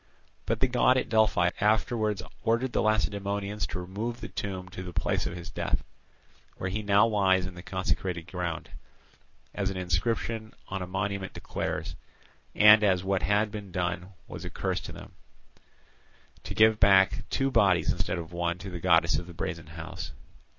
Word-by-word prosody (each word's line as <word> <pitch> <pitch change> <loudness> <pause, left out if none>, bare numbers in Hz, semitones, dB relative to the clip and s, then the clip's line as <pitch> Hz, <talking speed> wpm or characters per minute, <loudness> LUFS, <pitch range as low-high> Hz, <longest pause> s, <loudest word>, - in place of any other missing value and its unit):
But 115 -1 -1
the 130 - +4
god 125 +1 +4
at - - -1
Delphi 110 -6 +3
afterwards 105 -1 +1 0.2
ordered 120 +2 +1
the - - +2
Lacedaemonians 100 -1 0
to 90 - -5
remove 105 +7 -4
the - - -7
tomb 95 -2 -4
to 90 - -7
the 90 -1 -6
place - - 0
of - - -5
his 85 - -8
death—where 90 - -6
he 105 +3 -2
now 100 0 +5
lies 95 -4 +3
in 95 - -6
the 90 - -9
consecrated 90 -2 -2
ground, 85 -3 -4 0.8
as 100 -2 -1
an 95 - -4
inscription 110 +5 -1
on 95 0 -3
a 90 - -4
monument 95 +1 -3
declares—and, 105 0 +1
as 95 -3 +3
what 95 -1 0
had 105 +2 +2
been 105 -3 -7
done 90 +1 -2
was - - -8
a - - -5
curse - - -2
to - - -8
them, - - -11 1.3
to - - -5
give 110 0 +5
back 95 -1 +5
two 135 0 0
bodies 95 -8 +4
instead 90 0 -2
of 85 0 -7
one 85 0 -1
to 95 +1 -8
the 90 - -5
goddess 85 -1 +4
of 90 - -8
the 85 - -11
Brazen 80 -3 -4
House. 85 +2 -7
95 Hz, 170 wpm, -28 LUFS, 90-105 Hz, 1.3 s, now